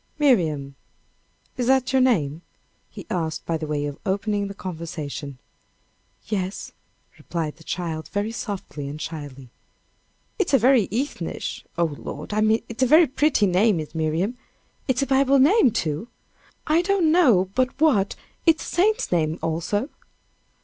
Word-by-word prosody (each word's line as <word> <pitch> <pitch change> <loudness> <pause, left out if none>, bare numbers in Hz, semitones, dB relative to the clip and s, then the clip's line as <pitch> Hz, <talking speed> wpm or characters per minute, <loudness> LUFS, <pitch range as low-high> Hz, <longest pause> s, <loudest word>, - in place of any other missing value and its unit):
"Miriam! 160 - +2 0.8
Is 245 -2 -1
that 265 -1 +2
your 265 - +4
name," 165 - +1 0.5
he - - -10
asked, 160 -3 -2
by 165 - -1
way 150 -2 -2
of 145 -1 -6
opening 205 +1 -1
the 200 - -8
conversation. 160 -6 -6 0.9
"Yes," 195 -2 -3 0.5
replied 160 -3 -4
the - - -16
child, 165 -3 -4
very 205 +2 -2
softly 195 -10 -5
and 150 +2 -7
shyly. 145 -6 -7 0.9
"It's 345 -8 +3
a - - +7
very 245 -3 +4
heathenish 235 - -4
oh, 170 - +3 0.2
Lord! - - -7
I 215 - +1
mean 220 +1 +3
it's 230 +2 -7
a 260 - +4
very 315 +6 +7
pretty 275 -4 +2
name 190 0 +3
is 155 - -7
Miriam, 165 +9 -1 0.5
it's 260 0 +1
a - - 0
Bible 275 0 +3
name, 295 - +5
too. 160 -1 -2 0.6
I 315 +3 +3
don't 360 -3 +2
know 235 - +4
but 255 +3 0
what 240 -11 +3 0.3
it's 325 -2 +3
a - - -8
saint's 430 +7 +2
name 160 -2 +1
also." 170 - -1
205 Hz, 150 wpm, -23 LUFS, 160-265 Hz, 0.9 s, a